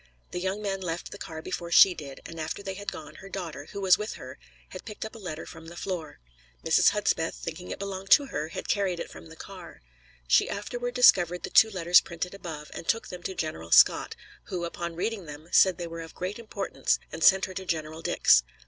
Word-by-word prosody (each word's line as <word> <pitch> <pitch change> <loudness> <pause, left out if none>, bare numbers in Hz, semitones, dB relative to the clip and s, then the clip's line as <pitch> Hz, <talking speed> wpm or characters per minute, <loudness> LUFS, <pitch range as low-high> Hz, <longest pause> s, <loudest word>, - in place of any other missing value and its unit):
The 180 - -3
young 190 +3 -2
men 195 -1 -2
left 170 -1 -4
the 200 - -9
car 160 -1 -7
before 170 - -4
she 180 +2 +8
did, 145 -5 -9
and 165 0 -8
after 160 +5 -4
they 195 - -4
had 205 +2 -5
gone 155 - -9
her 195 - -11
daughter, 165 -7 -6
who 200 - -6
was 185 -1 +5
with 210 +1 -4
her, 130 +2 -10 0.3
had 185 - -9
picked 215 0 -7
up 220 - -8
a 225 - -10
letter 160 -6 -6
from 165 0 -11
the 170 - -10
floor. 170 -6 -5 0.5
Mrs. 160 - +5
Hudspeth, 200 -6 0
thinking 175 +3 -7
it - - -4
belonged 195 -1 -6
to 285 - +7
her, 155 - -3
had 165 - -7
carried 190 -4 0
it - - -6
from 80 +1 -11
the - - -12
car. - - -11 0.4
She - - +4
afterward 245 +4 -4
discovered 180 -8 +5
the - - -5
two 220 - +7
letters 180 -3 +5
printed 170 +2 -5
above, 160 -6 -8
and - - -8
took 225 - 0
them 180 -1 -8
to 190 - -5
General 120 - -4
Scott, - - +6 0.3
who, 175 -2 -3
upon 170 0 -5
reading 195 0 -3
them, 150 +3 -10
said 185 -3 +5
they 175 - -4
were 165 0 -7
of 165 -1 -10
great 190 +5 -4
importance, 210 -3 -1
and 165 - -4
sent 190 -1 +6
her 185 - -8
to 190 - -5
General 160 -1 -3
Dix. 60 - +5
180 Hz, 230 wpm, -28 LUFS, 160-195 Hz, 0.5 s, she